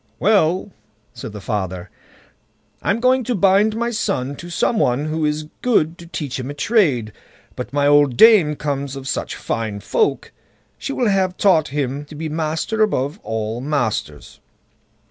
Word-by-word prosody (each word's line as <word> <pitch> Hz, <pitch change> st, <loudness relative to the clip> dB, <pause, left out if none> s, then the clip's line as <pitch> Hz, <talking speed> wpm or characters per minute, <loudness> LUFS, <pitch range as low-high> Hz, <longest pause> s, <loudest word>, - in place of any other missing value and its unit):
"Well!" 190 Hz, -1 st, +2 dB, 0.4 s
said -, -, -8 dB
the 105 Hz, -, -8 dB
father, 95 Hz, -4 st, -4 dB, 0.9 s
"I'm 200 Hz, +3 st, 0 dB
going 255 Hz, +1 st, +3 dB
to 245 Hz, -, -1 dB
bind 200 Hz, +3 st, +3 dB
my 235 Hz, +1 st, -1 dB
son 140 Hz, -, -2 dB
to 175 Hz, -, -9 dB
some 210 Hz, +6 st, 0 dB
one 125 Hz, -, +1 dB
who 155 Hz, 0 st, -1 dB
is 150 Hz, 0 st, -1 dB, 0.2 s
good 170 Hz, -10 st, +2 dB
to 170 Hz, -, -11 dB
teach 145 Hz, -6 st, -4 dB
him 130 Hz, +1 st, -5 dB
a 145 Hz, -, -6 dB
trade; 145 Hz, -, +1 dB, 0.4 s
but 120 Hz, -, -6 dB
my 145 Hz, 0 st, +1 dB
old 145 Hz, -3 st, +4 dB
dame 205 Hz, -10 st, +6 dB
comes 140 Hz, -2 st, -3 dB
of 135 Hz, -1 st, -7 dB
such -, -, -3 dB
fine 110 Hz, -3 st, -3 dB
folk, 420 Hz, -, 0 dB, 0.5 s
she -, -, -4 dB
will 250 Hz, -3 st, 0 dB
have 190 Hz, -2 st, +1 dB
him -, -, -37 dB
taught 175 Hz, -7 st, +4 dB
to 145 Hz, +1 st, -4 dB
be 160 Hz, +1 st, -4 dB
master 160 Hz, +7 st, -2 dB
above 160 Hz, -5 st, 0 dB
all 110 Hz, +1 st, -3 dB
masters." 120 Hz, -, -3 dB
150 Hz, 165 wpm, -20 LUFS, 130-195 Hz, 0.9 s, dame